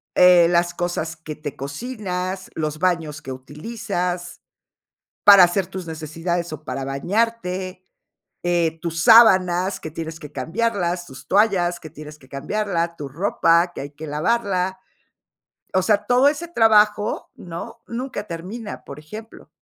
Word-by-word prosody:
eh, 180 -2 +7
las 175 0 +2
cosas 170 -2 -3
que 155 -1 -8
te 150 -2 -7
cocinas, 185 - -4
los 155 -1 -3
baños 160 -4 0
que 130 - -7
utilizas 175 - -4 0.8
para 200 -3 +10
hacer 175 +1 0
tus 185 -2 -7
necesidades 165 +2 -3
o 155 0 -8
para 135 -2 -4
bañarte, 185 +4 -2 0.6
eh, 170 -2 +1
tus 165 -2 -2
sábanas, 190 -5 +6
que 160 - -6
tienes 160 0 -6
que 150 -1 -11
cambiarlas, 175 - -1
tus 130 -5 -12
toallas, 190 -4 +3
que 155 - -10
tienes 150 0 -11
que 130 - -19
cambiarla, 170 +4 -2
tu 145 - -5
ropa, 170 +2 +2
que - - -6
hay 140 - -7
que 150 +2 -9
lavarla. 185 +3 0 1.0
O 185 - +3
sea, 205 +1 +2
todo 250 +3 +5
ese 310 +4 -2
trabajo, 215 -6 +3
¿no?, 175 +7 -8
nunca 235 -3 -5
termina, 200 +6 -7
por 140 - -9
ejemplo. 215 +9 -11
175 Hz, 140 wpm, -22 LUFS, 160-205 Hz, 1.0 s, para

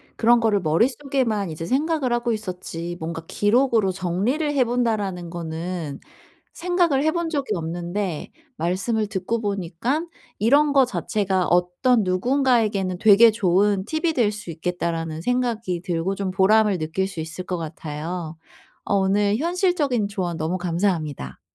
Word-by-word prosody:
그런 240 +1 +4
거를 220 -3 +2
머릿속에만 225 - 0
이제 160 +1 -5
생각을 275 - 0
하고 240 0 0
있었지 180 -5 -5
뭔가 165 0 -5
'기록으로 225 -2 +2
정리를 195 - -1
해 275 -3 +4
본다.'라는 215 -8 -1
거는 165 -2 -5 0.5
생각을 345 -5 +1
해 315 - +3
본 340 0 -2
적이 285 - -1
없는데 175 +1 -3 0.3
말씀을 195 +6 0
듣고 215 +3 -2
보니깐 205 - -2 0.3
'이런 285 +7 +4
거 270 -2 +6
자체가 195 -6 -1
어떤 180 +7 +2
누군가에게는 210 -2 +1
되게 220 +2 +7
좋은 200 -1 +2
팁이 320 +1 -1
될 230 -7 +2
수 205 -4 -7
있겠다.'라는 165 -1 -3
생각이 230 -7 -1
들고 180 0 -1
좀 195 -1 -2
보람을 205 +1 +4
느낄 160 +5 -1
수 195 -4 -8
있을 165 +3 -6
것 180 - -2
같아요. 160 +1 -5 0.5
어 - - -1
오늘 200 +2 +2
현실적인 315 - 0
조언 180 -5 -3
너무 165 +4 -2
감사합니다. 165 - -2
200 Hz, 315 characters per minute, -23 LUFS, 175-240 Hz, 0.5 s, 되게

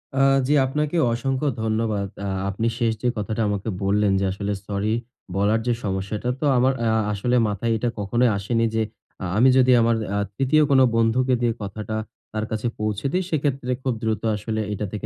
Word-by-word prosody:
আ - - +1 0.3
জি, 145 - +3
আপনাকে 150 +5 -1 0.2
অসংখ্য 135 +4 -1 0.2
ধন্যবাদ। 110 -2 0 0.2
আ - - -2 0.2
আপনি 110 +4 -1
শেষ 120 -2 +1
যে, 125 - 0
কথাটা 105 +2 -2
আমাকে 100 +2 -2
বললেন 100 0 +2
যে, 100 - 0
আসলে 100 +1 -3
সরি 100 +1 -1 0.4
বলার 105 +3 +2
যে, 120 - +3
সমস্যাটা 100 +4 -2
তো 150 - -1
আমার 130 +2 +3
আ - - +2 0.3
আসলে 120 +5 0
মাথায় 105 +3 -1
এটা 120 +2 -1
কখনোই 120 +5 +2
আসেনি। 115 +3 0
যে, 110 - +2 0.4
আ - - -2
আমি 130 +3 +6
যদি 130 0 +5
আমার 115 0 +3 0.2
আ - - +1 0.2
তৃতীয় 140 +3 +3
কোন 135 - +6 0.2
বন্ধুকে 125 +3 +2
দিয়ে 120 -1 +2
কথাটা 105 +2 -5 0.4
তার 110 0 -1
কাছে 110 +2 -1
পৌঁছে 105 +1 -2
দেই। 185 +1 +1
সেক্ষেত্রে 135 -5 -1
খুব 130 - 0
দ্রুত 110 -2 0
আসলে 110 +1 -3
এটা 105 +1 -3
থেকে 105 - -5
115 Hz, 185 wpm, -23 LUFS, 105-125 Hz, 0.4 s, আমি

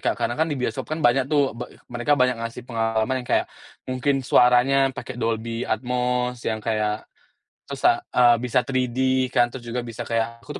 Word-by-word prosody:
Kak, - - +2
karena 120 +1 -1
kan 160 0 0
di 145 - -2
bioskop 115 -3 -2
kan 160 - -2
banyak 130 0 +3
tuh, 140 -5 +2
be 120 - -5 0.2
mereka 120 +4 0
banyak 125 -3 +3
ngasih 115 +1 -7
pengalaman 115 +2 -1
yang - - -15
kayak, - - +2 0.4
mungkin 135 +2 0
suaranya 130 +2 +4
pakai 130 -1 -7
Dolby 115 0 -2
Atmos 125 +1 -1
yang 110 -1 -2
kayak 105 -1 -2 0.6
tusa - - +1
eee, 120 -1 +6
bisa 125 +1 +1
3D 130 +1 0
kan, 120 -1 +3
terus 120 -1 -10
juga 120 +1 -3
bisa 115 -1 -7
kayak 115 0 -2
aku 150 - -7
125 Hz, 180 wpm, -23 LUFS, 115-130 Hz, 0.6 s, eee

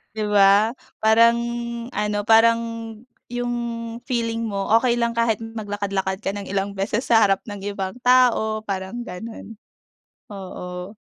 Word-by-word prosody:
Di 215 - -2
ba? 205 +2 +5 0.3
Parang 230 +2 +5 0.5
ano, 210 0 -1
parang 225 +1 +5 0.7
yung 245 0 -3 0.6
feeling 230 -3 -1
mo 200 -1 -3
okey 240 -1 +1
lang 235 -1 0
kahit 230 -1 +1
maglakad-lakad 205 -3 -3
ka 195 - 0
ng 200 0 -6
ilang 200 +1 -1
beses 200 +5 -2
sa 230 - +4
harap 195 -3 +3
ng 205 -2 -8
ibang 195 -2 -3
tao 245 -4 +3
parang 195 +3 -4
gano'n, 220 +4 -8 0.8
oo. 185 0 -7
215 Hz, 130 wpm, -22 LUFS, 195-230 Hz, 0.8 s, ba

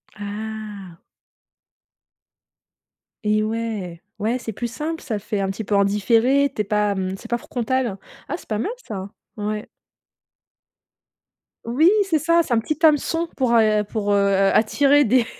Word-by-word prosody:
Ah! 210 -3 -7 2.2
Et 215 0 +2
ouais. 215 -6 -4 0.2
Ouais, 225 +4 0
c'est 225 -3 -6
plus 240 +4 -3
simple. 320 +5 -4
Ça 220 -5 -3
fait 210 0 -3
un 195 -1 0
petit 205 +3 -4
peu 205 - -1
en 200 0 +4
différé, 230 +7 +3
tu - - 0
es - - 0
pas, 210 0 +1
mmh, 190 0 -2
c'est 230 - -12
pas 240 - +1
frontal. 245 -3 -2 0.3
Ah, - - -2
c'est - - -16
pas 215 -1 -2
mal 410 - -1 0.2
ça. 195 -2 -5 0.3
Ouais. 210 0 -3 2.0
Oui, 275 +9 +4
c'est 340 -5 +1
ça, 335 +2 +3
c'est 250 - -2
un 230 - +4
petit 300 +6 -3
hameçon 325 +2 +2
pour 255 -3 +1
a 215 -2 +4
pour, 205 -1 -2
heu, - - +4 0.4
attirer 280 +6 +4
des 245 +1 +3
220 Hz, 155 wpm, -22 LUFS, 205-260 Hz, 2.2 s, en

